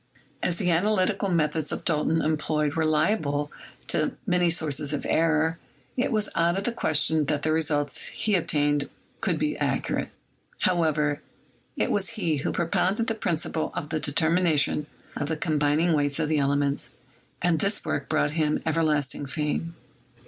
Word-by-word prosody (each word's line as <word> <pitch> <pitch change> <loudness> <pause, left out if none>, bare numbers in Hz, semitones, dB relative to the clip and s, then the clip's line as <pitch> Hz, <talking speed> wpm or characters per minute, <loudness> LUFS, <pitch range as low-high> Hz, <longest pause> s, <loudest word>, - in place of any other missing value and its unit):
As 175 - 0
the 180 0 0
analytical 195 +2 +1
methods 160 -2 0
Dalton 160 0 0
employed 150 -1 0
were 160 0 +1
liable 150 -2 +1 0.3
to - - 0
many 180 -3 +2
sources 150 -3 +1
of 145 - -3
error, 160 0 +2 0.4
it 255 +1 0
was 215 -2 +1
out 170 +2 +2
of 195 - -1
the 240 - 0
question 160 -7 +1
that 145 +1 -1
the 155 - +1
results 150 -3 0
he 215 - -2
obtained 145 -5 +1 0.3
could - - 0
be - - 0
accurate. - - -1 0.5
However, 155 -5 +1 0.5
he - - 0
it - - -1
was 200 -2 +1
who 165 -10 -1
propounded 185 +6 +1
the 225 - 0
principle 165 -6 -2
of 150 - -4
the 155 - -1
determination 155 -1 +2 0.3
of 145 - -2
the 160 - -1
combining 150 +2 +2
weights 145 -2 +1
of 155 -2 0
the 155 -1 +2
elements, 140 0 +1 0.5
and 175 -3 +2
this 200 +4 0
work 145 - -2
brought 145 - +2
him 150 -1 0
everlasting 150 -3 0
fame. 155 +4 -2
160 Hz, 155 wpm, -26 LUFS, 150-175 Hz, 0.5 s, many